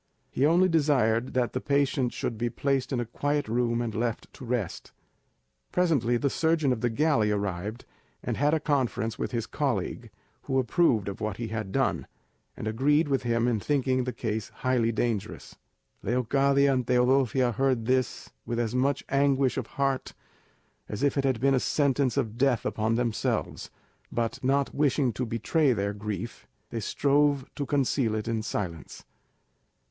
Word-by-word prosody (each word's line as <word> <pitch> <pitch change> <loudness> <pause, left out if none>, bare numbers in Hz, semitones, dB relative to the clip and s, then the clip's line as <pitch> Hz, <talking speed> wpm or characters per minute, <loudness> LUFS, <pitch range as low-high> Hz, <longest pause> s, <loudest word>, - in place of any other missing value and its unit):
He 140 - +2
only 175 +4 +4
desired 130 -8 +2
that 125 -2 +1
the 130 - -2
patient 140 -3 +1
should 115 - -3
be 120 +2 -1
placed 135 +3 -1
in 130 - 0
a 120 - -1
quiet 145 +5 -1
room 120 +1 0
and 115 -2 -3
left 115 +1 -3
to - - -12
rest. 120 -7 -3 0.8
Presently 140 -10 +2
the 140 - 0
surgeon 160 -2 +2
of 110 - -5
the 120 - +1
galley 120 -3 +2
arrived, 100 +2 -3 0.4
and - - -2
had 145 +3 +2
a - - +1
conference 125 -7 -1
with - - -2
his 115 -3 -2
colleague, 120 -3 -2 0.4
who 135 -1 0
approved 125 - +2
of 100 - -5
what 105 -2 -2
he 115 -2 -4
had 110 -3 -4
done, - - 0 0.5
and - - -5
agreed 145 +7 +2
with 135 -2 +1
him 120 -1 +1
in 115 -3 +1
thinking 130 +1 +1
the 125 - -2
case 110 -3 -3 0.2
highly 120 -3 +2
dangerous. 115 -3 -3 0.5
Leocadia 135 +4 +2
and 125 -2 -1
Teodosia 125 0 +3
heard 130 -1 0
this 130 0 -1
with 120 - -3
as 115 -1 -1
much 130 +2 +1
anguish 135 -1 +2
of 130 -4 -3
heart 135 -1 -1 0.7
as 105 +6 -4
if 140 - +2
it 140 -1 0
had 130 -4 +1
been 135 +2 +3
a 130 - +3
sentence 140 -2 +1
of 115 +1 -2
death 135 -3 +2
upon 110 +1 0
themselves; 120 -2 -1 0.4
but 115 +1 -2
not 140 +1 +1
wishing 140 -3 +1
to 125 +3 -3
betray 130 +6 +1
their 100 -2 -1
grief, 105 -2 -6 0.2
they 115 - -3
strove 140 +3 +2
to 140 - -4
conceal 135 -5 +1
it 110 +1 -3
in 115 -1 -1
silence. 85 -8 -5
125 Hz, 170 wpm, -27 LUFS, 115-140 Hz, 0.8 s, only